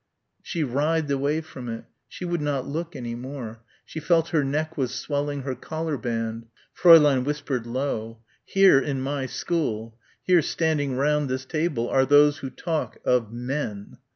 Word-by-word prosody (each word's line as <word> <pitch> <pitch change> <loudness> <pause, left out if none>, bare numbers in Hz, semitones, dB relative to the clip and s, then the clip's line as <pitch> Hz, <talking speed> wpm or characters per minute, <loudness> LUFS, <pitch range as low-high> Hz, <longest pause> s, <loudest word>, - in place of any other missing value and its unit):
She 165 -3 -2
writhed 150 +3 0
away 140 +3 0
from 130 -6 -9
it. 115 0 -5 0.2
She 180 - -7
would 175 -2 -1
not 145 -3 -1
look 165 +4 -4
any 120 -2 -5
more. 120 -2 -7 0.2
She 160 - -6
felt 165 +1 +2
her 155 -4 +2
neck 155 +4 -2
was 125 -4 -2
swelling 145 +1 -2
inside 135 - -5
her - - 0
collar 160 -1 -3
band. 115 -2 -3 0.3
Fräulein 150 -7 +7
whispered 135 -4 -3
low. 115 -3 -3 0.3
"Here 195 -7 +5
in 135 0 -2
my 135 0 -2
school, 115 -10 -2 0.3
here 180 -2 +4
standing 150 -4 0
round 150 0 +1
this 130 +1 -3
table 155 -6 -1
are 130 +1 +2
those 145 +2 +5
who 135 - -5
talk 160 +2 -3
of 120 -4 +2
men. 120 -4 -5
140 Hz, 165 wpm, -25 LUFS, 125-155 Hz, 0.3 s, Fräulein